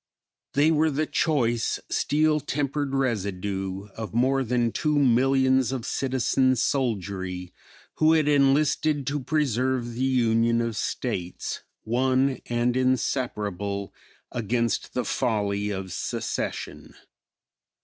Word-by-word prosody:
They 150 +3 +4
were 160 0 +3
the 155 +2 0
choice, 120 -9 +1
steel 155 +1 +2
tempered 145 -1 -2
residue 100 -5 -2
of 110 0 -6
more 135 +3 +2
than 120 -1 +1
two 150 +4 0
millions 130 0 +3
of 130 -3 -3
citizen 130 0 +1
soldiery 95 -8 -2 0.4
who 155 +1 +5
had 155 -2 +3
enlisted 145 +1 +3
to 145 +3 -1
preserve 130 -4 0
the 125 +3 -2
union 115 -2 +2
of 115 -1 -1
States, 90 -2 -3 0.2
"one 130 +3 +1
and 120 +1 0
inseparable," 105 -6 -1 0.4
against 115 0 -1
the 125 - 0
folly 105 -4 0
of 95 -3 -4
secession. - - -4
125 Hz, 110 wpm, -25 LUFS, 110-135 Hz, 0.4 s, who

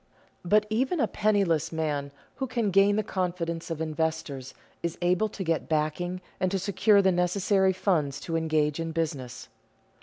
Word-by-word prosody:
But 210 +4 +3
even 260 +9 +1
a 230 - +3
penniless 195 -9 +1
man 150 -3 -2 0.3
who 265 - -2
can 230 -4 0
gain 195 +2 +5
the 215 - +1
confidence 175 -4 -3
of 165 -2 -3
investors 160 -4 -3 0.3
is 170 -1 -3
able 180 +4 +2
to 195 - -5
get 165 -2 -1
backing 160 +4 -1 0.2
and 185 - +1
to 195 - 0
secure 200 +2 +3
the 190 - +4
necessary 190 +2 +2
funds 160 -7 0
to 165 - -3
engage 155 -2 +1
in 165 0 -3
business. 145 - -3
175 Hz, 160 wpm, -27 LUFS, 160-195 Hz, 0.3 s, gain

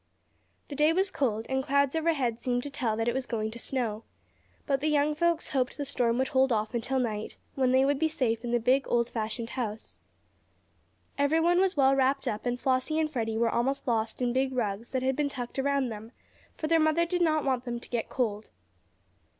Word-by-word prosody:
The 285 - -6
day 300 +3 +4
was 380 +2 +1
cold, 225 - -1
and 265 0 -1
clouds 280 +1 +2
overhead 285 -8 0
seemed 245 0 -1
to 285 - -5
tell 240 -6 -1
that 225 +1 -1
it 240 - +2
was 260 -1 -3
going 220 -2 -2
to 235 - -9
snow. 230 -4 -2 0.6
But 275 -2 +1
the 305 - 0
young 300 0 +2
folks 340 +2 0
hoped 260 -2 -1
the 290 - -3
storm 235 -3 +1
would 260 +1 0
hold 265 -2 +3
off 215 0 0
until 240 +3 -1
night, 220 -4 -2 0.2
when 260 -2 +1
they 260 +1 +4
would 280 0 +1
be 320 - +3
safe 250 -7 -1
in 240 - -3
the 240 0 +2
big, 260 +4 +2
old 235 0 +1
fashioned 225 +1 -3
farmhouse. 220 -4 -5 1.2
Everyone 325 +5 +3
was 375 -3 +1
well 270 -1 +5
wrapped 270 +1 +1
up, 215 +3 -2
and 245 0 -1
Flossie 260 +4 0
and 310 -1 0
Freddie 225 -5 -2
were 230 0 +2
almost 265 +4 -1
lost 225 +1 -1
in 240 -1 +1
big 265 +1 0
rugs 225 -2 -2
that 260 -1 -2
had 265 0 +1
been 295 0 0
tucked 250 -1 -5
around 275 -1 +1
them, 220 +2 -8 0.4
for - - -3
their 330 +1 +3
mother 315 +2 +3
did 355 +1 -1
not 310 -3 +2
want 260 -2 0
them 240 -1 -3
to - - -10
get 235 -2 -3
cold. 215 -4 -2
260 Hz, 215 wpm, -28 LUFS, 235-285 Hz, 1.2 s, well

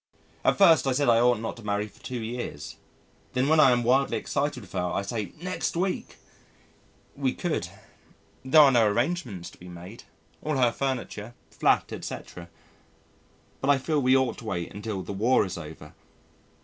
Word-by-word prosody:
At - - +3
first 165 -8 +6
I 135 - +2
said 140 0 +2
I 115 -1 +5
ought 120 0 +4
not 115 - -5
to 115 - -12
marry 105 0 -1
for - - -20
two 125 -3 -5
years. 120 +2 -6 0.6
Then 130 +1 +1
when 160 +1 +4
I 145 - +8
am 120 -1 +2
wildly 130 +3 +2
excited 140 -2 -2
with 100 - -14
her - - -2
I 100 - -1
say 105 0 -4
"next 180 -1 -3
week." 185 +1 -2 1.0
We 135 -2 -1
could. 175 -3 -2 0.8
There 135 +4 +7
are 140 -2 +7
no 115 -4 +4
arrangements 120 - -2
to - - -19
be 90 - -11
made. 90 +6 -11 0.4
All 155 -2 -1
her 125 -2 +4
furniture 120 -3 -4 0.2
flat, - - +1
etc. 85 -1 -7 1.1
But 135 - -1
I 145 - +6
feel 150 +2 0
we 130 +1 +5
ought 130 -3 0
to 115 - -11
wait 90 -4 -4
until 100 -2 -4
the 95 - -6
War 110 +3 +3
is 95 - -5
over. 75 -2 -10
120 Hz, 180 wpm, -27 LUFS, 105-140 Hz, 1.1 s, I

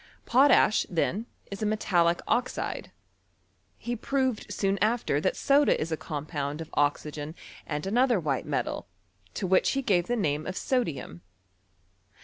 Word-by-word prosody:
Potash, 255 -3 +5
then, 195 +6 -1 0.2
is 200 - -6
a - - 0
metallic 175 -5 +2
oxide. 250 +1 -1 0.9
He 240 0 -4
proved 260 -1 -1
soon 195 0 0
after 215 -9 +1
that 185 - 0
soda 285 +1 +3
is 160 +1 -3
a - - +1
compound 150 -1 -4
of 160 - -7
oxygen 145 +1 -1 0.3
and 150 +1 -3
another 240 +2 +3
white 145 -5 -2
metal, - - -2 0.5
to - - -2
which 185 0 +3
he 275 0 -1
gave 180 -7 +2
the 245 - 0
name 155 -8 -1
of 185 - -4
sodium. 165 - -2
190 Hz, 140 wpm, -28 LUFS, 155-240 Hz, 0.9 s, Potash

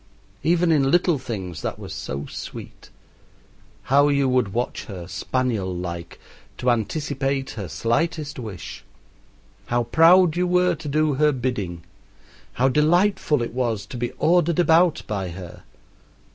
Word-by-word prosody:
Even 175 0 +2
in 140 -4 +3
little 175 -1 +3
things 95 -9 -6
that - - -3
was - - -8
so 70 +2 -5
sweet. - - -9 0.9
How 140 +2 +4
you 140 -1 +2
would 125 -5 +1
watch 120 +4 -3
her, 90 -5 -8
spaniel 100 +1 -2
like, 85 -1 -6 0.4
to 125 - +2
anticipate 135 +3 -2
her 100 -4 -6
slightest 145 - -1
wish! 105 -8 -8 0.8
How 120 0 +1
proud 165 +7 +5
you 180 +1 +1
were 180 0 +3
to 155 -2 -8
do 155 +1 +2
her 150 +2 +3
bidding! 110 - -3 0.7
How 130 - +2
delightful 155 0 +2
it 115 - -5
was 115 -5 -1
to 120 - -8
be 120 0 -2
ordered 170 -1 +2
about 170 -1 +4
by 95 -4 -3
her! 85 0 -9
130 Hz, 140 wpm, -23 LUFS, 105-155 Hz, 0.9 s, proud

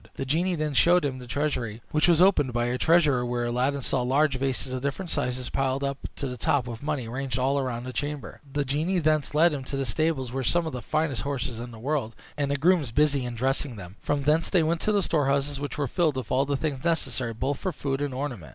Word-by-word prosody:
The 135 - -3
genie 170 +7 +1
then 155 -2 -2
showed 175 +4 +5
him 130 -2 -2
the 125 - -10
treasury, 120 -5 -2
which 155 +2 +3
was 170 -2 +5
opened 160 -9 +4
by 120 0 +1
a 125 +1 -1
treasurer, 150 -7 +4
where 120 0 -1
Aladdin 130 +3 0
saw 130 - 0
large 135 +3 +2
vases 130 0 -1
of 130 - -3
different 140 +6 -3
sizes, 125 0 -2
piled 135 0 0
up 140 0 -2 0.2
to - - -4
the 125 -1 -5
top 130 +2 +1
with 120 -2 -7
money, 145 -5 -2
ranged 130 +1 -3
all 135 +2 +1
round 125 -2 -3
the 130 - -6
chamber. 145 +1 -4
The 145 0 -1
genie 155 +8 0
thence 155 -3 +1
led 165 +1 +5
him 140 -2 -4
to 135 - -4
the 135 - -1
stables, 135 -1 0
where 130 - -4
were 135 - -1
some 175 +6 +2
of 160 - -4
the 125 - -4
finest 155 -3 -1
horses 135 -4 -3
in 120 +1 -6
the 115 - -11
world, 125 -2 -2 0.2
and 145 -1 -1
the 140 - +1
grooms 160 -2 +3
busy 145 0 +2
in 120 -1 -4
dressing 130 +1 -1
them; 95 -2 -10
from 145 -1 -1
thence 155 +3 +2
they 180 -4 +3
went 165 +1 0
to 215 - +1
the 205 -2 +2
storehouses, 140 -3 +1
which 145 +1 -4
were 145 -2 0
filled 155 +1 +1
with 130 -4 -5
all 135 +2 +2
things 140 -1 -2
necessary, 130 -8 0
both 135 +4 -1
for 185 - -2
food 135 -2 -3
and 145 -1 -1
ornament. 125 - -4
140 Hz, 250 wpm, -26 LUFS, 125-150 Hz, 0.2 s, showed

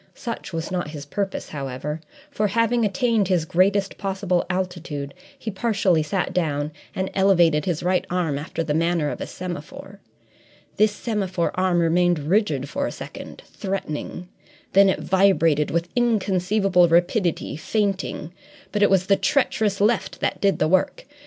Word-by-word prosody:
Such 235 -4 -6
was 165 0 -4
not 180 -4 -2
his 150 -2 -8
purpose, 195 +6 -3
however, 145 +2 -5 0.3
for, 215 -6 0
having 230 +3 +1
attained 215 0 +1
his 180 -4 +1
greatest 195 +4 +1
possible 190 -3 -1
altitude, 175 -6 -3 0.2
he 220 - -5
partially 195 -5 +1
sat 175 +5 -2
down 150 -4 -1 0.2
and 190 0 -2
elevated 175 -6 +3
his 175 -3 -1
right 180 +1 +2
arm 170 -6 -1
after 160 +2 -4
the 155 -2 -1
manner 165 -1 +1
of - - -6
a - - -4
semaphore. 185 +3 -8 0.8
This 215 0 +4
semaphore 195 -6 -2
arm 185 -1 +1
remained 175 +1 +3
rigid 150 - 0
for 280 - -2
a - - -4
second, - - -9
threatening; 180 -3 -5 0.5
then 195 0 +6
it - - 0
vibrated 175 -6 +3
with 170 +1 -1
inconceivable 195 -5 +2
rapidity, 175 0 +1
feinting. 190 -1 -2 0.4
But 210 - -1
it 205 - +5
was 190 -1 +3
the 195 - +4
treacherous 220 -7 +1
left 215 +3 +1
that - - -2
did 195 -5 +3
the 155 - +2
work. 185 +3 +1
185 Hz, 150 wpm, -23 LUFS, 165-200 Hz, 0.8 s, then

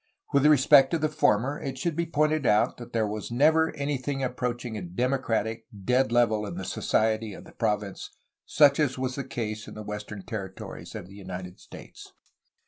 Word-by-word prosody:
With 140 +1 +5
respect 140 -2 +6
to 170 - +1
the 155 -1 +1
former 140 -2 +1
it 135 -3 -4
should 170 -3 -2
be 170 +1 -1
pointed 155 -1 +1
out 105 +1 +3
that 120 0 -10
there 115 -2 +1 0.2
never 155 +6 +4
was - - -5
anything 140 -1 -2
approaching 125 -2 -3
a 105 - -4
democratic, 115 +3 -1 0.2
dead 125 0 +2
level 115 -3 +3
in 95 - -6
the 95 - -5
society 110 -1 0
of - - -11
the - - -14
province 105 -3 -2 0.4
such 145 -1 +5
as 140 -4 +1
was 130 0 -2
the 140 - -4
case 110 -4 -5
in - - -10
the 110 - -7
western 105 -1 -6
territories 95 -4 -7
of - - -6
the 95 - -14
United 95 -2 -8
States. - - -13
120 Hz, 185 wpm, -27 LUFS, 105-140 Hz, 0.4 s, respect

